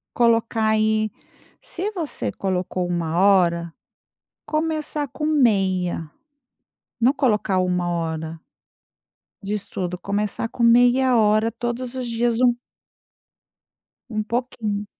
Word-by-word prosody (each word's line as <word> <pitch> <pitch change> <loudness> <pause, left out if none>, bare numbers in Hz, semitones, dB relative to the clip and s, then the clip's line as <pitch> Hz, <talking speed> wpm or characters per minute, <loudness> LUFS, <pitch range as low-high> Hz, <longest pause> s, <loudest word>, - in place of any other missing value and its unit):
Colocar 230 -2 +2
aí, 215 0 +2 0.5
se 375 +4 -4
você 340 -8 -3
colocou 185 -1 -2
1 170 -2 -2
hora, 175 -3 +3 0.7
começar 310 -1 -1
com 280 +3 -8
meia, 195 - +1 0.9
não 245 +3 +5
colocar 215 -8 +1
uma 180 -1 0
hora 160 -1 -3 1.0
de 200 +1 -4
estudo, 185 -3 -3
começar 205 +4 -2
com 235 - -4
meia 245 +2 +5
hora 215 +1 +3
todos 240 +2 -4
os 255 -1 -3
dias 235 0 0
um 245 -1 +5 1.6
um 215 -2 -2
pouquinho. 220 -3 -3
215 Hz, 105 wpm, -22 LUFS, 185-245 Hz, 1.6 s, não